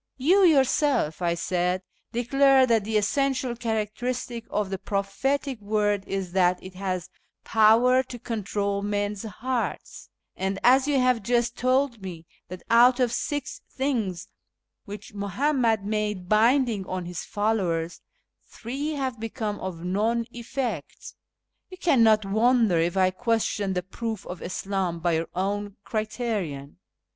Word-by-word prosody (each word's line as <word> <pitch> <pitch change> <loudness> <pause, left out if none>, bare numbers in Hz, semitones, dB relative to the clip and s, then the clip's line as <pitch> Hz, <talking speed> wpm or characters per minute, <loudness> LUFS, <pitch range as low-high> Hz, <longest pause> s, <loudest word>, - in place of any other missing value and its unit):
" - - -54
You 385 +3 +6
your 310 -7 +6
self," 260 - 0
I 170 -1 +1
said, 180 +2 -1
" - - -39
declare 265 +3 +4
that 230 -4 +2
the 220 0 +1
essential 265 +3 0
characteristic 230 +1 -3
of 205 -2 -2
the 195 - -3
prophetic 220 +7 -2
word 205 -1 0
is 195 -2 -3
that 180 -1 +3
it 185 0 -9
has 185 -2 -4 0.3
power 230 +4 +5
to 255 -1 -9
control 200 -3 -2
men's 205 0 -2
hearts; 235 +3 -4 0.3
and 190 +1 -2
as 260 +3 +5
you 285 -2 +2
have 250 -2 +2
just 240 +2 0
told 255 -2 +1
me 175 -4 -8 0.2
that 180 0 -9
out 245 +2 +6
of 245 -2 +2
six 280 +1 -3
things 225 -10 -2 0.6
which 205 +1 -9
Muhammad 225 +1 0
made 210 -3 -2
binding 230 0 +3
on 185 -1 -4
his 175 -1 -5
followers, 185 -6 -1 0.5
three 275 +7 -4
have 260 -5 -3
become 220 -2 -4
of 175 -3 -6
none 220 +5 0
effect, 245 +2 -5 0.6
you 370 - -10
cannot 230 - +4
wonder 220 -2 +3
if 170 +3 0
I 185 -1 +4
question 210 -2 -1
the 180 -1 -2
proof 220 +2 -5
of 180 - -7
Islam 185 -2 -2
by 170 +1 +1
your 165 0 -1
own 200 +2 -2
criterion. 215 - -3
215 Hz, 140 wpm, -26 LUFS, 190-245 Hz, 0.6 s, You